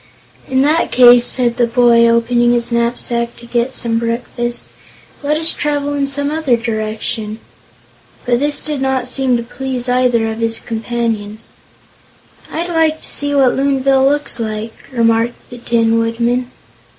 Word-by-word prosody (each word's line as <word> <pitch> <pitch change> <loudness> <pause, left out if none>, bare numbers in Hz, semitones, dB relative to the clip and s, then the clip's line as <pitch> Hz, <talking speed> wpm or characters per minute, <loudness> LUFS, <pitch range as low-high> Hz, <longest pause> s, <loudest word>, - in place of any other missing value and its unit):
"In 260 0 +2
that 310 +3 +1
case," 245 -1 +7
said 240 -2 +1
the 240 - +2
boy, 235 -1 +4
opening 240 +1 +2
his 240 0 -1
knapsack 235 0 -1
to 235 - -13
get 240 +2 -1
some 230 -1 -1
breakfast, 240 +1 -3 0.5
"let 300 +1 0
us 325 +1 +1
travel 290 -1 -2
in 280 -1 -1
some 285 +1 -2
other 305 -6 +1
direction." 220 -1 -3 0.9
But 240 -1 +1
this 290 +1 -1
did 295 -3 -4
not 265 -2 0
seem 255 -1 +1
to 235 - -4
please 255 +1 -5
either 245 -3 +2
of 220 - -6
his 225 0 0
companions. 225 -2 -4 1.0
"I'd 340 +2 -3
like 320 -2 +1
to - - -4
see 285 0 -2
what 265 -3 +4
Loonville 270 0 +2
looks 290 -4 -1
like," 220 0 -4 0.2
remarked 230 -1 +1 0.2
the 245 - -9
Tin 230 -1 +1
Woodman. 235 +2 -1
240 Hz, 150 wpm, -16 LUFS, 230-270 Hz, 1.0 s, case